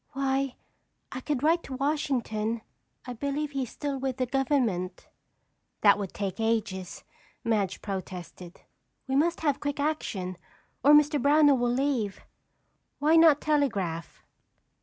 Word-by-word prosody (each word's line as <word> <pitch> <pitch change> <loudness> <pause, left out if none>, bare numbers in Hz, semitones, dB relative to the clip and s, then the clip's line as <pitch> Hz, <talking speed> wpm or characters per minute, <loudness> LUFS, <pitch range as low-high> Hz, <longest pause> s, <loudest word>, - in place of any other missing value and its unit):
"Why, 270 -1 0 0.6
I 255 - -5
could 290 -1 -2
write 330 +2 +3
to 265 - -6
Washington. 250 -6 -1 0.4
I 250 - -5
believe 280 +4 -3
he's 270 -4 -3
still 285 -2 -4
with 265 -1 -2
the 255 - 0
government." 240 -9 -1 0.7
"That 205 -1 +6
would 195 -3 -4
take 200 0 -4
ages," 215 -5 -2 0.4
Madge 210 -5 -1
protested. 185 -2 -7 0.5
"We 265 - -1
must 335 +5 +2
have 290 -3 +1
quick 285 0 -3
action 210 - -2 0.5
or 290 - +7
Mr. 295 -1 +5
Brownell 290 -1 +5
will 240 0 +1
leave. 245 -5 -1 0.8
Why 305 +3 +3
not 320 -3 +6
telegraph?" 200 - -1
265 Hz, 130 wpm, -28 LUFS, 210-290 Hz, 0.8 s, or